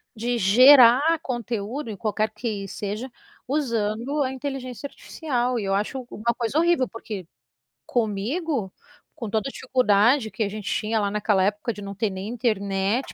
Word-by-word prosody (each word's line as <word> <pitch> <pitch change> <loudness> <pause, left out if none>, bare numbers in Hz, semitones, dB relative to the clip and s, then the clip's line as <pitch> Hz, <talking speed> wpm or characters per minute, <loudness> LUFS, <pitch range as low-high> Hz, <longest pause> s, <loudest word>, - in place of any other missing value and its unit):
de 240 +2 -1
gerar 255 - +7
conteúdo, 240 +1 -4
em 205 - -5
qualquer 215 +2 -1
que 215 -3 -4
seja, 210 +7 -5 0.4
usando 245 0 -1
a 260 - -2
inteligência 265 -1 -5
artificial, 250 -5 -2
e 205 - -3
eu 195 0 +1
acho 240 +5 -3
uma 235 +3 -1
coisa 235 +4 -1
horrível, 340 -7 +3
porque 210 -6 -7 0.6
comigo, 235 - -1 0.4
com 235 -8 -5
toda 220 +6 -1
a - - -9
dificuldade 245 -2 +2
que 205 - -7
a 200 - -1
gente 210 0 -7
tinha 220 +1 0
lá 200 -1 0
naquela 210 -2 +2
época, 210 +4 -1
de 205 - -10
não 200 0 -6
ter 210 +1 0
nem 190 +1 -6
internet 215 -1 -1
230 Hz, 160 wpm, -24 LUFS, 205-255 Hz, 0.6 s, gerar